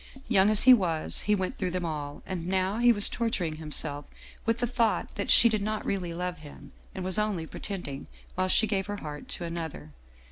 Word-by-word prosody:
Young 200 -3 +4
as 215 -1 +8
he 255 - +9
was 170 -9 0
he 210 - +5
went 185 -2 -4
through 185 - -1
them 180 0 -3
all, 145 -3 -5
and 175 -3 -5
now 190 +3 0
he 240 0 +6
was 205 -3 +3
torturing 185 -9 -2
himself 150 -2 -2 0.4
with 230 0 +2
the 245 - 0
thought 235 -2 0
that - - -4
she - - +8
did 215 -2 0
not 215 +1 -3
really 185 -3 -2
love 180 0 -4
him 145 -1 -13 0.2
and 185 - -5
was 185 +3 +1
only 205 -6 -1
pretending, 160 -6 -6 0.3
while 185 0 0
she 220 - +4
gave 195 -2 -1
her 205 0 -4
heart 150 -5 -8
to - - -5
another. 165 - -6
185 Hz, 210 wpm, -28 LUFS, 160-210 Hz, 0.4 s, he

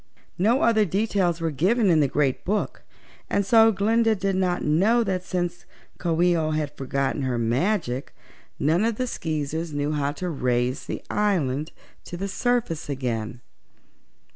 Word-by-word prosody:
No 230 +8 +3
other 220 -2 +4
details 195 -3 0
were 165 -1 -1
given 190 - +2
in 160 - +4
the 145 - +3
Great 140 -1 0
Book 210 +3 -2 0.5
and 200 - +1
so 225 +2 +6
Glinda 225 +3 +2
did 195 -1 -1
not 180 -1 0
know 200 +11 +3
that 185 -3 -2
since 175 -1 -3 0.3
Coo 170 -2 -1
ee 175 -1 +4
oh 160 -2 0
had 155 -1 -2
forgotten 135 +1 -2
her 130 -2 -1
magic 130 - -1 0.5
none 160 +7 +2
of 230 0 +1
the 255 - -1
Skeezers 160 - -3
knew 145 +1 -1
how 145 -2 0
to 180 +3 -5
raise 125 -5 -1
the - - -5
island 155 -8 0 0.3
to 175 - -7
the 195 +3 -3
surface 230 -8 -1
again. 120 -4 -3
170 Hz, 160 wpm, -24 LUFS, 145-200 Hz, 0.5 s, so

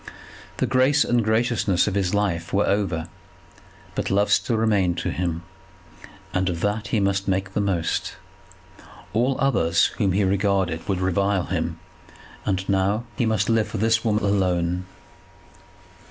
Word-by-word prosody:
The - - +1
grace 135 +3 +3
and 120 -1 +2
graciousness 110 -4 +1
of 105 - -1
his 95 -2 0
life 100 -5 -1
were 100 +1 +2
over; 95 -5 0 0.9
but - - -2
love 100 +1 +2
still 115 - +2
remained 100 -6 +1
to - - -2
him, 85 -1 -2 0.9
and 95 +1 +1
of 85 -2 -4
that 105 +1 -1
he 110 - 0
must 100 0 0
make 95 0 -1
the 105 - 0
most. 95 -5 -1 1.0
All 125 +5 +1
others 85 -12 +2
whom 100 -4 +2
he 100 +2 +2
regarded 95 -3 0
would 95 -2 -1
revile 95 +1 +1
him, - - -2 0.7
and 95 -1 -1
now 100 +3 +1
he 120 - 0
must 110 -3 +1
live 115 -2 +2
for - - -5
this 115 +2 +2
woman 110 -2 +1
alone. 90 -2 0
100 Hz, 150 wpm, -23 LUFS, 95-110 Hz, 1.0 s, grace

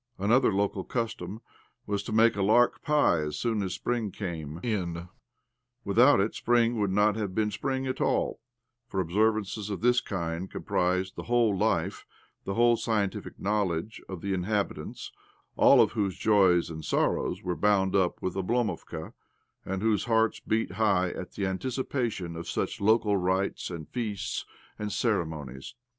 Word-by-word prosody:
Another 115 +6 +3
local 100 -1 0
custom 110 -3 -4 0.4
was 100 -1 -1
to 100 - -7
make 115 +1 +4
a 100 - -2
lark 115 +5 +3
pie 150 - +3
as 75 -1 -3
soon 115 -3 0
as 95 -2 -2
spring 120 -3 -2
came 80 -6 -5
in. 90 -6 -2 0.8
Without 115 +6 +5
it 100 +3 +1
spring 120 -1 +2
would 100 -2 +1
not 105 +2 +3
have 105 -4 -3
been 105 -1 +1
spring 130 +5 -2
at 130 0 -3
all, - - 0 0.5
for 95 - -3
observances 105 +3 0
of 100 - -4
this 125 +1 +4
kind 85 -3 -4
comprised 90 +1 -1
the - - -7
whole 120 -4 +3
life, - - 0 0.4
the 95 - -3
whole 120 0 +5
scientific 105 -5 -2
knowledge, 100 -1 -1
of 95 -3 -6
the 100 0 -2
inhabitants, 100 +3 -3 0.4
all - - +6
of - - -1
whose 100 -5 -1
joys 95 -6 +3
and 80 -1 -7
sorrows - - 0
were 90 -1 -2
bound 100 -2 +2
up 95 -3 +1
with 95 - -1
Oblomovka, 110 +4 -2 0.5
and 95 +1 -3
whose 110 -2 +2
hearts 115 -1 +2
beat 110 +1 -1
high 95 -5 +2
at 90 - -7
the 100 - -2
anticipation 115 -3 -2
of 85 +1 -6
such - - -2
local 105 -1 +3
rites 95 +1 -1
and 85 -4 -7
feasts 105 -5 -3 0.3
and 105 -1 -3
ceremonies. 80 - -2
100 Hz, 155 wpm, -28 LUFS, 95-110 Hz, 0.8 s, all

